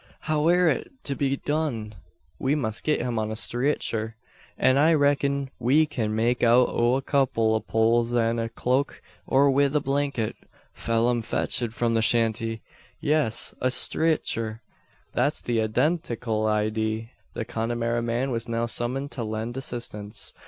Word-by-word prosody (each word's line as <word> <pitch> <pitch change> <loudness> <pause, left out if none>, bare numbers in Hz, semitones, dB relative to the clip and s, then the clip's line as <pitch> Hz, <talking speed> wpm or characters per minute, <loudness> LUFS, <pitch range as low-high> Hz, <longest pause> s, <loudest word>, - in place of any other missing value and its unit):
How 155 0 0
air 180 +1 +4
it 150 - 0
to 140 - -2
be 135 -1 0
done? 140 -9 -2 0.5
We 135 +2 +1
must 115 -6 -2
git 150 -4 +1
him 120 -2 -1
on 110 0 -2
a 110 - -3
streetcher. 115 -2 -1 0.4
That 130 - +3
I 155 +4 +5
reck'n 140 -1 +1
we 135 +6 +4
kin 110 -8 -2
make 120 +2 +1
out 120 +1 +5
o' 120 +2 +2
a 135 - -2
kupple 125 -6 +1
o' 110 - +2
poles 115 +2 +1
an 115 0 +2
the 115 0 -2
cloak; 130 +4 -1 0.2
or 140 +1 +4
wi' 140 +1 +3
the 150 +2 +1
blanket 140 -5 -1 0.4
Pheelum 115 +1 0
fetch'd 115 0 -1
from 120 -1 0
the 115 - +2
shanty. 115 0 +1 0.4
Ye 150 -2 +1
es! 145 -8 +1
a 130 - +2
streetcher. 130 -4 +1 0.5
That's 145 - +1
the 120 -2 -1
eydentikul 115 -2 0
eyedee." 110 +1 -1 0.2
The 110 - -3
Connemara 115 0 -1
man 120 +3 -1
was 115 0 -3
now 115 0 0
summoned 125 +4 -2
to 120 - -4
lend 110 +2 -4
assistance. 115 -5 -5
120 Hz, 160 wpm, -25 LUFS, 115-140 Hz, 0.5 s, I